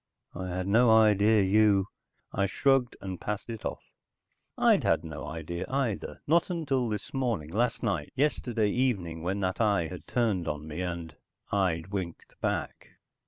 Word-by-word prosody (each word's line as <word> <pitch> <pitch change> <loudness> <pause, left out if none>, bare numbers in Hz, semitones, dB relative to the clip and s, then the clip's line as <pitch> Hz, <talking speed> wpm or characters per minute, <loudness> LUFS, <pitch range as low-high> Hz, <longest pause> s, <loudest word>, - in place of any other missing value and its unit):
I 95 +1 -5
had 90 0 -3
no 115 +4 +5
idea 110 -1 +5
you...." 100 0 +4 0.5
I 100 0 +1
shrugged 135 +4 +2
and 95 -2 -6
passed 105 +2 -4
it 115 - -7
off. - - -4 0.7
I'd - - +4
had - - +2
no 80 -2 -7
idea 80 +3 -4
either, 130 -6 -2
not 170 +4 +3
until 140 -8 0
this 110 +7 -5
morning, 115 - -1
last 120 +6 0
night, 95 -10 -1
yesterday 120 -6 +1
evening 95 -11 0
when 95 +4 -2
that 95 +3 -1
eye 100 -7 +2
had 90 - -9
turned 105 -8 0
on 75 0 -4
me 80 +3 -5
and 85 -3 -4 0.4
I'd 90 -3 0
winked 95 -4 -5
back. - - -3
100 Hz, 160 wpm, -29 LUFS, 90-120 Hz, 0.7 s, no